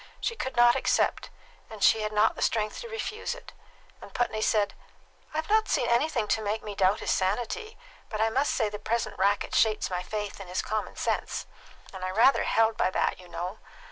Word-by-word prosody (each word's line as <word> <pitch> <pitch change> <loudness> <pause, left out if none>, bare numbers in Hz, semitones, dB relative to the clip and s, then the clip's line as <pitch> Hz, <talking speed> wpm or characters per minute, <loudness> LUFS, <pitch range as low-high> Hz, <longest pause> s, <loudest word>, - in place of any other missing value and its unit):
She 465 - -2
could 260 - -4
not 240 0 +6
accept, - - +1 0.4
and 220 -3 -6
she 220 - +5
had 215 0 -2
not 210 +1 +3
the - - -8
strength 215 -2 0
to 470 - -8
refuse 445 -1 -4
it; - - -13 0.5
and - - -11
Putney 230 -3 -1
said: 210 -2 +2 0.6
"I've 315 +1 -3
not 435 +1 +3
seen - - +1
anything 235 -2 +1
to 220 - +2
make 215 +1 -2
me 210 - -5
doubt 195 +1 +2
his - - -1
sanity; 245 - -1 0.3
but 215 - -4
I 225 +1 +2
must 275 +5 +1
say 220 - +1
the 210 0 -6
present 215 -1 -2
racket 200 +1 +1
shakes 215 -3 +2
my 180 0 -1
faith 205 +2 -5
in 190 - -9
his 180 +1 -2
common 215 0 -3
sense, - - -2 0.5
and 190 -1 -7
I 185 - -1
rather 225 +8 +4
held 225 0 +2
by - - +2
that, 185 - 0
you 180 - -13
know. 175 +4 -5
215 Hz, 205 wpm, -28 LUFS, 200-240 Hz, 0.6 s, not